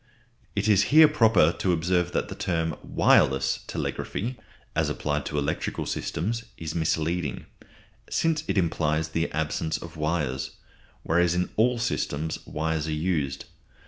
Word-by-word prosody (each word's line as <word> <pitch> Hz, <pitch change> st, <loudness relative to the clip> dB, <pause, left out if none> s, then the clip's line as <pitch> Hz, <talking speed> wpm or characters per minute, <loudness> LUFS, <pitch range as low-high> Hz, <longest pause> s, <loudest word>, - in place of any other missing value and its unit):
It 100 Hz, +1 st, 0 dB
is 105 Hz, -3 st, +5 dB
here 155 Hz, +3 st, +8 dB
proper 115 Hz, -, +4 dB
to 95 Hz, -, +2 dB
observe 90 Hz, +1 st, +1 dB
that -, -, 0 dB
the -, -, -6 dB
term 80 Hz, -3 st, -1 dB
wireless 65 Hz, 0 st, +3 dB
telegraphy, 120 Hz, +6 st, -3 dB, 0.4 s
as -, -, +1 dB
applied 75 Hz, 0 st, -2 dB
to 75 Hz, -, -3 dB
electrical 75 Hz, +1 st, -2 dB
systems, 115 Hz, +8 st, -2 dB
is 80 Hz, -1 st, -5 dB
misleading, 80 Hz, +1 st, -1 dB, 0.6 s
since 160 Hz, -2 st, +1 dB
it -, -, 0 dB
implies 80 Hz, -3 st, +1 dB
the 80 Hz, +1 st, -1 dB
absence 80 Hz, +1 st, -1 dB
of 85 Hz, -1 st, -10 dB
wires; 75 Hz, -4 st, -2 dB, 0.5 s
whereas 85 Hz, +1 st, +2 dB
in 90 Hz, +1 st, -1 dB
all 120 Hz, +3 st, +3 dB
systems 80 Hz, -9 st, -2 dB
wires 80 Hz, 0 st, -1 dB
are -, -, -2 dB
used. 75 Hz, -4 st, -1 dB
80 Hz, 140 wpm, -26 LUFS, 75-95 Hz, 0.6 s, here